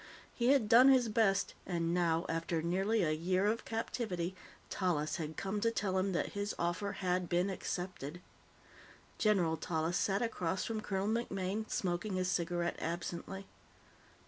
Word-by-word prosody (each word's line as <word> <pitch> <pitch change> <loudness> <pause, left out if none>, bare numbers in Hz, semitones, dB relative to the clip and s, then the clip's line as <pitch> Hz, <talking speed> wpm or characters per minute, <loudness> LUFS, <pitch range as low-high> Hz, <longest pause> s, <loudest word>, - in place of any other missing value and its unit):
He 240 - 0
had 265 -5 +4
done 245 +4 +8
his 255 -4 +5
best, 210 -3 +2
and 170 -2 -1
now, 170 -2 +2
after 165 0 -1
nearly 195 +5 +1
a 155 - +2
year 185 +5 +1
of 220 +2 0
captivity, 195 -6 -2 0.3
Tallis 170 -5 0
had 160 -2 -5
come 195 +1 -2
to 230 - +3
tell 190 -4 0
him 195 +1 0
that 170 - -1
his 205 0 -2
offer 175 +4 -1
had 180 -1 -1
been 180 +3 +2
accepted. 175 -4 -4 1.0
General 180 -7 +3
Tallis 160 +2 -1
sat 195 +3 +1
across 185 -5 -1
from 220 -1 -2
Colonel 195 -2 -2
MacMaine, 215 -2 -1
smoking 185 +2 -1
his 185 0 0
cigarette 175 0 -1
absently. 175 +3 -4
185 Hz, 150 wpm, -34 LUFS, 170-210 Hz, 1.0 s, done